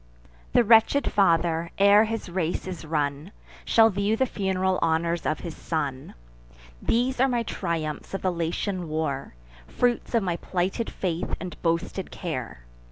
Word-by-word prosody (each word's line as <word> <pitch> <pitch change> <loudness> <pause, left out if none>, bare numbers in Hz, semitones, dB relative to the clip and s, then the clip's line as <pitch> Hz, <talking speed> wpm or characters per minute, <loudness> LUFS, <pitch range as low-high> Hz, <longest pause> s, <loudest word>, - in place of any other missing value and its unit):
The 245 - +5
wretched 230 +5 +4
father, 170 -3 +2
ere 200 +2 +6
his 225 0 -4
race 175 -2 -2
is 180 -4 -6
run, 150 +2 -2 0.3
Shall 225 -1 +5
view 200 +3 0
the 260 - +3
fun'ral 190 -4 0
honours 170 +1 0
of 155 - -1
his 170 -3 -6
son. 140 -5 -4 0.7
These 250 +2 +1
are 265 - +5
my 240 -2 0
triumphs 165 -5 -3
of - - -5
the 185 - +2
Latian 170 +1 -2
war, 145 - -3 0.3
Fruits 240 - 0
of 230 - +3
my 175 -3 -1
plighted 185 +6 -2
faith 175 -3 -2
and 180 -2 -6
boasted 170 +3 -1
care! 125 - -6
180 Hz, 150 wpm, -26 LUFS, 160-205 Hz, 0.7 s, ere